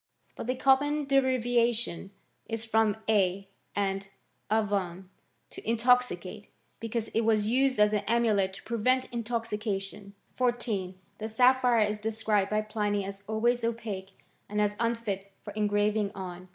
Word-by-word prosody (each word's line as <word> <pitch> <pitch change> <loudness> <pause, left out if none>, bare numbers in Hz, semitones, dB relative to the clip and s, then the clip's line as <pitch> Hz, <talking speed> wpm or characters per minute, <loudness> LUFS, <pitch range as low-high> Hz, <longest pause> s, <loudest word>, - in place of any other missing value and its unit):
But - - -6
the 255 - 0
common 285 +3 +3
derivation 240 -7 +1 0.4
is 225 0 -4
from 220 -2 +2
a 195 -2 +2 0.3
and 195 -1 -1 0.4
/Av9tm, 200 -4 0 0.5
to - - -9
intoxicatey 225 -4 +1 0.3
because 230 0 -3
it 225 - +1
was 220 -2 +2
used 255 +2 +2
as 210 0 +5
an 210 - +3
amulet 220 -5 +2
to 195 - -11
prevent 255 +3 +1
intoxication. 210 -4 -3 0.2
14. 235 -7 -1 0.2
The 220 +1 -4
sapphire 250 0 +4
is 210 0 -3
described 215 -2 0
by 215 0 +1
Pliny 210 -2 -1
as 195 0 -7
alway* 220 +2 +3
opaque^ 225 -5 -4 0.4
and 210 +1 -2
as 210 0 +1
unfit 220 -4 -2
for 205 - -8
engraving 210 0 +1
on. 185 -1 -7
220 Hz, 135 wpm, -29 LUFS, 200-235 Hz, 0.5 s, as